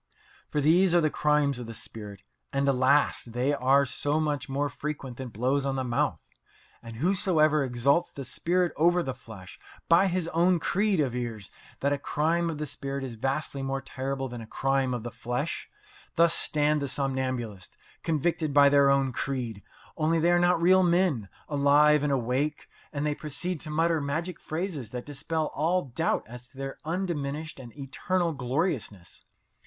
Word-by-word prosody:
For 150 - 0
these 175 +4 +4
are - - +6
the 155 -2 +1
crimes 150 -3 +1
of 120 - -7
the 115 - -7
spirit, 105 -2 -8 0.3
and, 140 0 0
alas! 135 +2 +3
they 125 +4 -1
are 140 +1 +3
so 145 +3 -1
much 145 -3 -1
more 140 +2 0
frequent 140 -3 -6
than 130 - -5
blows 130 +6 0
on 135 -1 -1
the 130 - -1
mouth. 120 -2 -1 0.5
And 115 -1 -9
whosoever 155 - +3
exalts 135 +6 +1
the 140 - -7
spirit 175 +4 0
over 175 +2 +3
the 130 - -3
flesh, 110 -7 -12 0.3
by 175 +4 +5
his 180 -2 -1
own 175 +2 +3
creed 195 +3 +1
avers 120 -7 -2 0.3
that 140 +1 +2
a 140 - -2
crime 165 +4 0
of 160 - -4
the 150 - -3
spirit 140 -1 -5
is 130 -3 -5
vastly 135 +4 -2
more 135 0 -2
terrible 135 0 -4
than 120 -2 -7
a 110 - -9
crime 135 0 0
of 120 - -5
the 120 - -5
flesh. 120 +2 -3 0.5
Thus 170 0 +5
stand 150 -1 +1
the 140 - -1
somnambulists 130 -7 -3 0.2
convicted 155 -1 -1
by 140 -1 +7
their 140 -1 +5
own 135 -1 +2
creed 120 -5 -3 0.4
only 160 +1 +2
they 170 +2 +3
are 175 - +4
not 175 0 +3
real 185 +3 +5
men, 170 - +2 0.2
alive 145 +1 +4
and 145 -1 0
awake, 135 +4 -1 0.2
and 145 -1 -2
they 150 - +1
proceed 155 +4 -4
to 155 - -7
mutter 165 +1 +1
magic 155 +5 -3
phrases 155 - -4
that 125 +1 -6
dispel 150 +2 -3
all 170 +5 +1
doubt 140 +5 -1
as 125 +1 -10
to 130 - -21
their 135 0 -6
undiminished 155 -4 -3
and 120 -3 -10
eternal 165 +5 -1
gloriousness. 125 - -3
140 Hz, 175 wpm, -28 LUFS, 130-160 Hz, 0.5 s, by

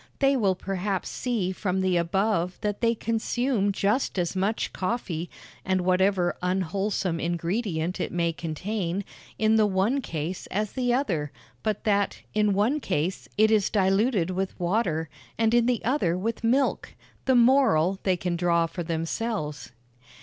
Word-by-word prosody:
They 275 0 +3
will 200 -7 +2
perhaps 195 +1 -3
see 225 -7 -1
from 190 0 -1
the 185 -1 +1
above 180 +1 0
that 205 -1 -2
they 230 0 +3
consume 225 -1 0
just 205 +4 0
as 175 0 -1
much 195 +4 -1
coffee 185 -5 -3 0.3
and 185 0 +1
whatever 185 0 +2
unwholesome 185 0 -1
ingredient 175 0 -2
it - - -2
may 170 -1 0
contain 180 +4 -3 0.3
in 220 0 +3
the 215 -1 +4
one 205 +8 +1
case 165 - -4
as 210 +1 -2
the 250 -2 0
other, 180 - 0 0.3
but 215 -2 -2
that, 205 -1 0
in 210 -1 +2
one 220 +10 +2
case, 180 - -2
it 220 +1 +5
is 210 -3 +3
diluted 195 -1 +2
with 190 +1 -3
water, 175 -3 0 0.3
and 225 0 +2
in 240 0 +4
the 245 -2 0
other 200 - +1
with 225 +5 -3
milk. 260 +4 +1 0.3
The 260 - +3
moral 235 - +4
they 185 -2 +1
can 175 0 -2
draw 170 -1 +2
for 165 +2 -5
themselves. 165 - -3
195 Hz, 150 wpm, -26 LUFS, 175-220 Hz, 0.3 s, it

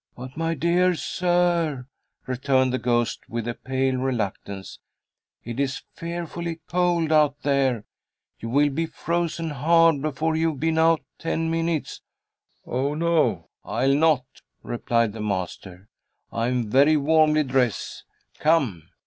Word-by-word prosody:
"But, 130 +1 -9
my 165 +1 -1
dear 175 +3 +2
sir," 175 -6 0 0.4
returned 130 0 +1
the 130 - 0
ghost, 120 -1 -1
with 115 0 -3
a 120 - -1
pale 130 +1 -1
reluctance, 105 -6 -4 0.6
"it 120 +2 -6
is 135 -1 -1
fearfully 170 0 -5
cold 175 -2 +1
out 150 -2 +3
there. 135 -5 +1 0.6
You 115 - -6
will 145 +4 +3
be 165 +4 -1
frozen 165 -1 -2
hard 165 +1 +4
before 155 +2 -1
you've 160 -3 0
been 160 +2 +1
out 165 0 +4 0.2
ten 165 0 -1
minutes." 165 -2 -2 0.6
"Oh 135 +4 -1
no, 170 0 +1
I'll 130 +4 +1
not," 150 -3 +3 0.4
replied 115 -2 0
the 110 - -7
master. 95 -1 -4 0.4
"I 115 +1 -1
am 120 -4 -1
very 145 +5 +5
warmly 155 +1 +3
dressed. 125 - -1 0.4
Come!" 130 - +1
145 Hz, 130 wpm, -24 LUFS, 125-165 Hz, 0.6 s, very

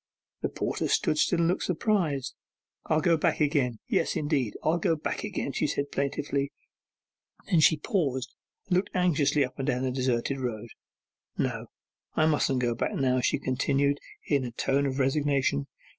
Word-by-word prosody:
The - - 0
porter - - -2
stood 155 - +1
still 175 - +3
and 165 - +3
looked 180 - +1
surprised. 170 - 0 0.5
'I'll 155 0 +2
go 165 +1 +3
back - - +1
again; 140 -6 +1
yes, - - +1
indeed, 145 -7 0
I'll 165 +2 +2
go 165 - +2
back 155 - -3
again!' - - -3
she - - 0
said 140 0 -2
plaintively. 140 0 -1 1.0
Then 170 - +5
she 155 0 +5
paused 140 - -1 0.3
and 180 - +2
looked 190 - 0
anxiously 150 -5 +3
up 130 - -12
and 135 - -2
down 125 -2 0
the 130 - 0
deserted 130 +1 0
road. 120 -3 -4 0.7
'No, - - -2 0.5
I 155 - +3
mustn't 140 -4 +2
go 120 -1 +2
back 115 - -2
now,' 130 -2 +2
she - - +2
continued, 140 +2 +1 0.3
in 140 -3 +1
a 125 - -3
tone 135 +4 0
of 130 0 -3
resignation. 135 - +1
140 Hz, 170 wpm, -28 LUFS, 130-155 Hz, 1.0 s, Then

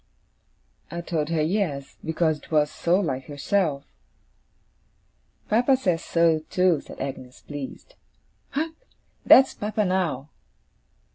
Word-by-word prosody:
I 170 - -5
told 160 -3 -2
her 160 -2 +1
yes, 155 -6 -1
because 160 -1 0
it - - -18
was 150 -1 +3
so 175 +3 +1
like 135 -9 -2
herself. 145 0 -1 1.6
'Papa 245 +5 +3
says 180 -10 0
so, 165 -2 +3
too,' 180 -5 +2
said - - -12
Agnes, 130 -2 -6
pleased. 145 - -8 0.6
'Hark! 315 +3 -2 0.5
That's 265 0 +7
papa 210 0 -1
now! 170 -7 -1
165 Hz, 115 wpm, -25 LUFS, 145-195 Hz, 1.6 s, That's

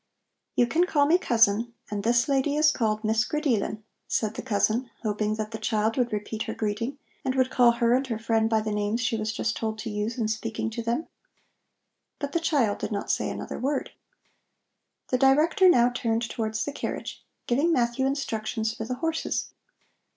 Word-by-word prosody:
"You 245 - +4
can 330 +8 +2
call 290 -4 +3
me 335 +5 +4
cousin, 230 - +2 0.2
and 205 -1 -2
this 240 +4 +3
lady 280 +1 +1
is 305 0 +5
called 215 -4 -1
Miss 220 +1 +2
Grideelen," 245 -8 -1 0.2
said 215 -1 0
the - - -5
cousin, 235 +1 0
hoping 215 0 0
that 215 0 -4
the 220 - -5
child 220 0 0
would 245 -2 0
repeat 215 +1 -4
her - - -4
greeting 230 +6 -2 0.3
and 260 - -1
would 260 -1 +2
call 240 -2 +5
her 235 0 +2
and 260 +2 +1
her 230 -3 -2
friend 225 0 +1
by 220 -1 +2
the 215 0 -3
names 210 +2 0
she 230 -1 0
was 215 0 -2
just 220 +1 -2
told 220 -1 -3
to 220 0 -5
use 210 +3 -2
in 225 -3 0
speaking 220 0 -3
to 235 - -4
them. 235 +7 -1 1.1
But 285 -1 -4
the 335 - +1
child 275 -10 +1
did - - -4
not 200 -1 -1
say - - 0
another - - -5
word. 275 +1 -1 1.2
The 255 - +1
Director 310 +8 +5
now 245 -7 +5
turned 230 -1 -1
towards 220 -1 -2
the 290 - -3
carriage, - - -5 0.2
giving 285 +8 +2
Matthew 245 -2 +1
instructions 225 -5 -2
for 220 -1 -5
the 250 +2 -3
horses. 320 +4 -2
230 Hz, 190 wpm, -26 LUFS, 220-265 Hz, 1.2 s, is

